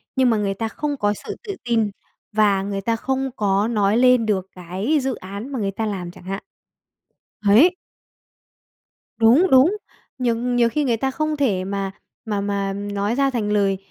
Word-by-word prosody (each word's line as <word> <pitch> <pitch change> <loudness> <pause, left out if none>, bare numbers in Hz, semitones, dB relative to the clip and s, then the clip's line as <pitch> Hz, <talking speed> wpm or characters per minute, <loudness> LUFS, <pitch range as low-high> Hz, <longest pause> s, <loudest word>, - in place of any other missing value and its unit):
nhưng 260 -2 +4
mà 225 - +2
người 200 -1 0
ta 225 +3 -3
không 290 +4 -3
có 205 -2 +1
sự - - -5
tự 405 -4 -5
tin 225 -3 +1 0.4
và 205 -2 +3
người 195 0 -3
ta 230 +3 0
không 265 +3 -2
có 200 0 +1
nói 210 -2 +2
lên 250 -2 +5
được 195 -3 0
cái 190 - -1
dự 265 -1 -1
án 200 +8 -8
mà 265 - -3
người 195 -1 -1
ta 220 +3 -3
làm 185 -4 -4
chẳng - - -15
hạn. 195 +1 -5 1.0
Ấy. 295 - +6 1.4
Đúng, 240 +11 +5
đúng, 275 +11 +5 0.4
nhiều 240 -3 +1
nhiều 245 0 +1
khi 300 +5 0
người 240 -5 +1
ta 265 +3 -1
không 310 +2 -1
thể 210 -10 +1
mà 195 0 -3 0.3
mà 210 -3 -1
mà 200 -1 -1
nói 205 +2 -2
ra 275 +1 +2
thành 225 -5 -2
lời 200 -2 +2
220 Hz, 185 wpm, -22 LUFS, 200-255 Hz, 1.4 s, Ấy